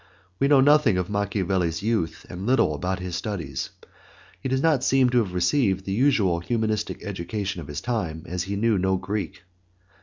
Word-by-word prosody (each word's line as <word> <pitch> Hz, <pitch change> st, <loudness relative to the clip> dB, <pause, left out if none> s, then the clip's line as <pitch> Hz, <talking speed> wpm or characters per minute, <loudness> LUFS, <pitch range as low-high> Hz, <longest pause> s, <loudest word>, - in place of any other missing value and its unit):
We 140 Hz, -, +3 dB
know 140 Hz, -2 st, +6 dB
nothing 145 Hz, -8 st, +5 dB
of 90 Hz, +2 st, -2 dB
Machiavelli's 95 Hz, -4 st, -1 dB
youth 110 Hz, -7 st, -1 dB
and 95 Hz, +4 st, -6 dB
little 130 Hz, -, +3 dB
about 90 Hz, +6 st, -2 dB
his 90 Hz, -2 st, -5 dB
studies. 85 Hz, -11 st, -4 dB, 0.7 s
He 130 Hz, -, -3 dB
does 130 Hz, +1 st, 0 dB
not 155 Hz, -5 st, +3 dB
seem 130 Hz, -2 st, +3 dB
to 125 Hz, -, +4 dB
have 95 Hz, -6 st, -2 dB
received 95 Hz, -1 st, +1 dB
the 95 Hz, -, -3 dB
usual 105 Hz, -8 st, +2 dB
humanistic 110 Hz, +2 st, -2 dB
education 100 Hz, -1 st, -4 dB
of 70 Hz, -, -9 dB
his 75 Hz, 0 st, -5 dB
time, 95 Hz, -10 st, -3 dB
as 90 Hz, 0 st, -3 dB
he 100 Hz, +1 st, -3 dB
knew 110 Hz, -1 st, +2 dB
no 95 Hz, +1 st, +1 dB
Greek. 100 Hz, -2 st, -4 dB
100 Hz, 180 wpm, -25 LUFS, 90-115 Hz, 0.7 s, know